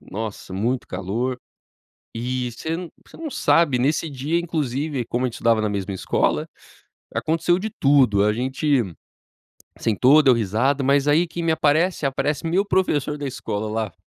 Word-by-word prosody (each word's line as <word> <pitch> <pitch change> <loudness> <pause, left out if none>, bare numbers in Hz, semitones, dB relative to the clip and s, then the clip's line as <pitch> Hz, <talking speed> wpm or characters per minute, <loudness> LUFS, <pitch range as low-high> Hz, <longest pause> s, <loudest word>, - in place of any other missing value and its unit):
nossa, 105 -2 -7
muito 120 +7 -1
calor. 115 +8 -3 0.8
E 125 +1 -2
você 160 +7 -5
n 175 -1 -6 0.2
você - - -15
não 320 -3 -6
sabe, 150 - +3
nesse 150 +5 +1
dia, 145 +5 -1
inclusive, 145 -4 -2
como 125 +2 -1
a - - +2
gente 115 - -9
estudava 115 -1 +2
na 110 - 0
mesma 100 -1 -3
escola, - - 0 0.7
aconteceu 165 +3 +1
de 220 +3 -4
tudo. 130 - +3
A 105 - +3
gente 130 +3 0 1.0
sentou, 130 +7 +4
deu 130 -2 +6
risada, 120 +6 +1
mas 140 +1 +2
aí 160 +4 +3
quem 170 +1 -5
me 165 - +2
aparece? 160 +1 +2
Aparece 140 +3 -1
meu 190 +5 +1
professor 150 -7 0
da 145 -1 -4
escola 110 -4 -4
lá. 110 -3 -3
135 Hz, 160 wpm, -22 LUFS, 115-155 Hz, 1.0 s, deu